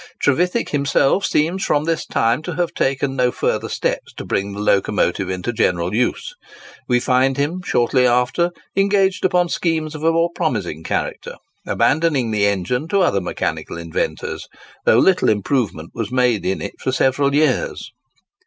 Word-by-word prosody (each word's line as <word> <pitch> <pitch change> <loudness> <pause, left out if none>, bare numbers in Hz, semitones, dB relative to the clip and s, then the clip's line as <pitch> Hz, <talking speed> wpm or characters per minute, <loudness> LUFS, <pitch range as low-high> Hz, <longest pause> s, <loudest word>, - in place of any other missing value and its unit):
Trevithick 180 - +1
himself 140 +5 +2
seems 170 +5 0
from 145 0 +1
this 165 0 -2
time 115 +4 +1
to 165 +1 -5
have 175 0 -1
taken 135 0 -1
no 125 -1 +2
further - - -1
steps - - -2
to - - -8
bring 100 +1 -2
the 100 - -7
locomotive 100 -2 +1
into 95 +6 -3
general 90 -5 0
use. 125 - -1 0.5
We 125 -1 +3
find 130 +2 +2
him, 155 +6 -1
shortly 125 -5 +2
after, 125 +8 +2 0.3
engaged 195 -1 +2
upon 180 -1 +2
schemes 160 -3 -1
of 155 0 -7
a 165 - +4
more 165 +1 +1
promising 95 - -2
character, - - -3 0.3
abandoning 145 -6 +1
the 105 -1 +2
engine 100 - -1
to 195 +3 +1
other 100 - +2
mechanical 90 - -3
inventors, 85 -1 -4 0.4
though - - +5
little 185 +8 +4
improvement 105 - -1
was 115 -2 -4
made 125 -7 +1
in 95 - -1
it 100 - -8
for 130 - -1
several 140 +2 +1
years. 155 - 0
130 Hz, 160 wpm, -20 LUFS, 105-165 Hz, 0.5 s, though